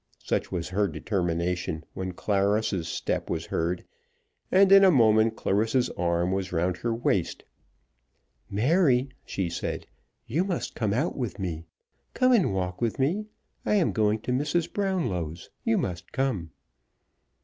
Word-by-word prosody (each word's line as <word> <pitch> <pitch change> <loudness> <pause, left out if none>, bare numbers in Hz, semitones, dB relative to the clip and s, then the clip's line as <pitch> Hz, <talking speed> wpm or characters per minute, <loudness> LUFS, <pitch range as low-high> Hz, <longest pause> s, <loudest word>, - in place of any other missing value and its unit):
Such - - -1
was 90 -1 -3
her 100 +2 +1
determination 85 -1 -2
when 95 -1 -4
Clarissa's 100 -2 0
step - - -2
was - - -2
heard, 85 +2 -2 0.7
and 195 +1 +5
in 195 0 +9
a 190 - +8
moment 110 -6 +4
Clarissa's 115 +6 +1
arm 85 +1 0
was 95 -1 -2
round 90 +1 0
her 120 - -2
waist. 105 -6 0 1.1
"Mary," 130 - +3 0.2
she 95 -3 -2
said, 85 - -4 0.4
"you 155 +10 0
must 190 -3 -3
come 110 -3 -1
out 140 +11 0
with 125 -5 -3
me. 85 -4 -4 0.5
Come 255 0 +4
and 220 - +4
walk 90 0 -3
with 115 -2 0
me. 180 +11 0 0.4
I - - +1
am 190 -6 +3
going 110 0 +2
to 125 - -3
Mrs. 150 +6 0
Brownlow's. 105 - -2
You 225 -2 +2
must 90 - -3
come." 120 -12 -1
105 Hz, 145 wpm, -27 LUFS, 90-135 Hz, 1.1 s, in